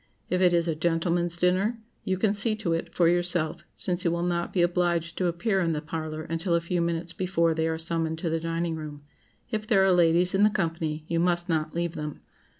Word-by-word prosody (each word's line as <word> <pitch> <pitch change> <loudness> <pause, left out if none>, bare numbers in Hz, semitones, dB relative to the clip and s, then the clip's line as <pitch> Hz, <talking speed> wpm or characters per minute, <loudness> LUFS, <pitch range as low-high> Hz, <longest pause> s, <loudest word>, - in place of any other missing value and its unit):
If 180 0 +1
it 180 -1 +5
is 170 -1 +2
a 165 - +1
gentleman's 170 +2 0
dinner, 185 +6 +2 0.3
you 190 - -1
can 200 +1 +2
see 215 +1 +1
to 205 -6 -1
it 165 +1 -4
for 170 - +4
yourself, 175 -2 +1
since 180 -1 0
you 170 - +2
will 170 +1 -1
not 175 -1 -1
be 180 - +2
obliged 175 -1 0
to 185 - +2
appear 190 +4 0
in 165 -3 +1
the 150 - -1
parlor 155 0 -4
until 165 +2 -1
a - - +3
few 170 +1 -1
minutes 170 0 -2
before 170 -3 +1
they 160 0 0
are 160 0 -1
summoned 160 0 -2
to 165 +1 -2
the 165 - 0
dining 165 +1 -2
room. 150 -2 -8 0.5
If 215 -1 -2
there 195 -4 +4
are 190 - +4
ladies 175 +1 +3
in 195 - +2
the 210 - +6
company, 165 -6 -2
you 165 0 0
must 175 +1 +1
not 155 -1 -1
leave 170 -1 -1
them. 150 -2 -5
170 Hz, 230 wpm, -27 LUFS, 165-180 Hz, 0.5 s, the